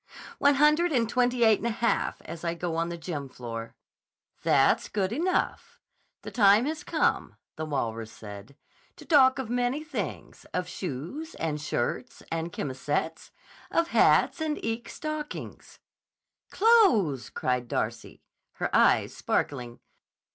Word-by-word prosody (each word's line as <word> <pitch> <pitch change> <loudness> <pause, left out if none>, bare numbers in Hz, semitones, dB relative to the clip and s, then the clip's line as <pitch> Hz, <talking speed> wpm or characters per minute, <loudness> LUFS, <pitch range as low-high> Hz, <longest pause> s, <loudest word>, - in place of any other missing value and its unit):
"One 285 0 +5
hundred 300 +5 +4
and 240 -5 +2
twenty 245 +1 +1
eight 220 -2 +5
and 235 - -2
a - - +1
half, 230 +1 -1
as 170 - -8
I 170 0 -1
go 170 -1 -3
on 165 +1 -1
the 170 - -5
gym 155 -5 -5
floor." 115 -2 -7 0.7
"That's - - +3
good 195 0 -1
enough. 355 +7 -1 0.4
'The - - -7
time 210 0 +5
has 310 +2 -3
come,' - - 0 0.2
the 155 - -4
walrus 115 -6 -3
said, 105 +4 -11 0.4
'to - - -13
talk 270 -4 +5
of 265 -3 -3
many 245 +4 0
things; 310 - -6
of 180 0 -1
shoes, 185 - -6
and 150 -2 -3
shirts, 150 - -3
and 165 +1 -2
chemisettes, 145 +4 -3 0.4
of 335 0 +1
hats 335 - +4
and 310 -1 -1
eke 225 +1 -3
stockings.'" 305 -1 -6 0.7
"Clothes!" 370 - +4
cried 125 -1 -1
Darcy, 115 0 -4 0.3
her - - -2
eyes - - +4
sparkling. 120 -4 -2
195 Hz, 140 wpm, -27 LUFS, -, 0.7 s, One